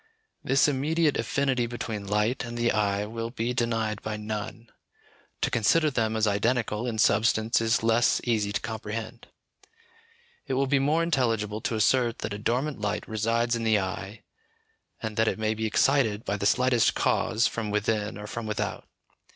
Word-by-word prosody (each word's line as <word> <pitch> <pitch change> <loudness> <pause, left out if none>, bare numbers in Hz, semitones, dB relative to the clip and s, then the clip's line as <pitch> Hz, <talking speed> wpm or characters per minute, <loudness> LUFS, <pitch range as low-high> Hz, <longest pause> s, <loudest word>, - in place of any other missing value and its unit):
This 135 +3 +3
immediate 150 +2 +1
affinity 125 +1 0
between 110 -4 -5
light 105 +6 0
and 120 -1 -6
the 120 0 +2
eye 105 -1 0
will 115 +1 -5
be 120 0 -2
denied 115 -3 -1
by 110 -1 -4
none; 105 +2 -6 0.7
to - - 0
consider 150 +8 +3
them 110 -3 0
as 110 0 +2
identical 110 +2 0
in 115 -2 -3
substance 110 +2 +3
is 115 +1 +1
less 115 +1 +3
easy 110 -4 0
to - - -1
comprehend. 110 +1 -6 1.2
It 135 - -1
will 135 +1 +2
be 135 +1 +2
more 150 +5 +2
intelligible 115 -9 0
to 115 - -2
assert 120 +2 +2
that 100 - -4
a 100 - -5
dormant 125 +4 -1
light 105 0 -2
resides 115 +2 0
in 115 - -3
the 110 -1 +3
eye, 95 +2 -5 0.8
and 110 -1 -4
that 110 0 +3
it - - 0
may 110 0 0
be 110 0 -2
excited 115 -2 +2
by 100 - -1
the 100 0 0
slightest 125 0 +3
cause 115 +1 +1
from 115 -2 -2
within 105 0 -1
or 105 - -7
from 115 +1 -5
without. 105 - -3
115 Hz, 170 wpm, -27 LUFS, 105-120 Hz, 1.2 s, This